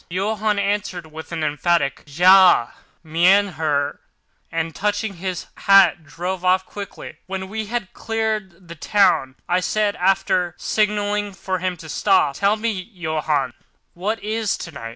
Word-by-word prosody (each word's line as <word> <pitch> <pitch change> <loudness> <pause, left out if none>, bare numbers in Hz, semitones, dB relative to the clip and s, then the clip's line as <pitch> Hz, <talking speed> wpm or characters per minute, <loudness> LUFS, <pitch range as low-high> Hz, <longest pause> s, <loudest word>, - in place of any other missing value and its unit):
Johann 210 +3 -1
answered 200 -5 -2
with 160 +2 -9
an 165 -2 -3
emphatic, 150 -1 0
"Ja, 180 -3 +6 0.3
mein 180 +6 +4
Herr," 150 -4 -1 0.5
and, 165 0 -2
touching 205 0 -2
his 185 0 -4
hat, 190 -4 +5
drove 180 +4 -5
off 185 +1 +3
quickly. 200 -2 -9
When 190 0 -4
we 215 0 -4
had 230 -4 -4
cleared 215 -5 -3
the 170 - -8
town, 160 -6 +2
I 180 +1 +2
said, 205 +2 0
after 180 -2 +1
signalling 205 -1 0
to 190 - -6
him 180 0 -2
to 160 - -11
stop: 185 -1 +2
"Tell 200 +5 +2
me, 225 +1 -1
Johann, 160 - -2 0.4
what 205 +6 -2
is 215 -1 -1
tonight?" 140 -9 -7
185 Hz, 140 wpm, -21 LUFS, 165-205 Hz, 0.5 s, Ja